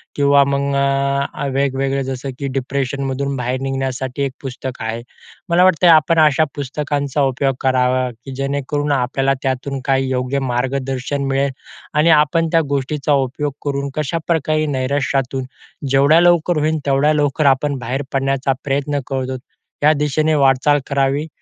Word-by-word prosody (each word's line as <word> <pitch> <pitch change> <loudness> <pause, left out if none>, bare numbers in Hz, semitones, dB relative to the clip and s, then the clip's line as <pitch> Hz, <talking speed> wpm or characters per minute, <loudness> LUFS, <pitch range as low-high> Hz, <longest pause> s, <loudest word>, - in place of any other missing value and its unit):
किंवा 140 0 +4
मग 140 0 0
अ, 140 0 0
वेगवेगळे 135 0 0
जसं 135 +1 -5
की 140 - -2
डिप्रेशनमधून 135 +1 -2
बाहेर 125 +1 -2
निघण्यासाठी 135 0 -3
एक 135 - -1
पुस्तक 130 -1 -6
आहे. 110 +1 -3 0.5
मला 175 +1 +4
वाटतंय 185 -1 +4
आपण 160 0 +5
अशा 155 +1 +3
पुस्तकांचा 145 0 -2
उपयोग 135 0 +1
करावा, 130 -1 +1
की 120 +4 -12
जेणेकरून 140 +2 -2
आपल्याला 135 +1 +1
त्यातून 135 +1 -2
काही 135 -1 +1
योग्य 130 +1 -1
मार्गदर्शन 130 +2 -2
मिळेल 135 +1 0 0.4
आणि 150 +3 +3
आपण 165 +2 +1
त्या 165 -1 +4
गोष्टीचा 140 +1 -1
उपयोग 145 +2 -4
करून 140 -1 -2
कशाप्रकारे 155 0 -1
नैराश्यातून 135 0 -1 0.5
जेवढ्या 140 +5 +5
लवकर 175 -1 +3
होईल, 155 +1 +1
तेवढ्या 140 +2 +3
लवकर 145 0 0
आपण 140 +1 -3
बाहेर 125 +3 -3
पडण्याचा 135 0 0
प्रयत्न 145 +1 -1
करत 130 -1 -3
आहोत 130 -1 -4 0.4
या 150 - +6
दिशेने 155 +2 +1
वाटचाल 140 +1 +3
करावी. 140 +2 0
140 Hz, 140 wpm, -18 LUFS, 135-145 Hz, 0.5 s, या